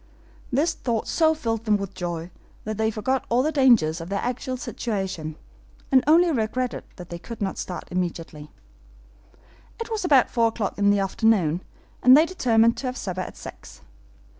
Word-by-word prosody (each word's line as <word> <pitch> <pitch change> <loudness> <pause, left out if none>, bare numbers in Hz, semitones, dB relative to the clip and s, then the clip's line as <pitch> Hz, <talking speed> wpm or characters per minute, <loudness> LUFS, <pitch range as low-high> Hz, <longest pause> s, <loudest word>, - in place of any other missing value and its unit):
This 315 +6 +2
thought 235 -8 -2
so 320 -1 +3
filled 230 -6 -3
them 210 -1 +3
with 200 -1 -6
joy 175 -1 -5 0.3
that 215 -1 -4
they 220 0 +2
forgot 250 +4 -1
all 245 +2 +3
the 310 - +1
dangers 235 - +4
of 165 - -7
their 200 0 -2
actual 255 +1 -3
situation, 190 -11 -4 0.6
and 260 -1 +5
only 335 +3 +5
regretted 245 0 -2
that 175 -1 -10
they 170 - -6
could 230 +6 -9
not 195 -2 -3
start 180 - -5
immediately. 165 -4 -4 1.3
It 460 0 -6
was 435 -3 -2
about 280 -8 +4
four 230 -1 +3
o'clock 220 -3 -3
in 200 0 +4
the 205 - +4
afternoon, 195 -4 +2 0.4
and 255 +2 +8
they 310 - +6
determined 230 -10 +2
to 265 - -4
have 255 0 -4
supper 185 -1 -4
at - - -7
six. - - -11
225 Hz, 175 wpm, -24 LUFS, 185-260 Hz, 1.3 s, and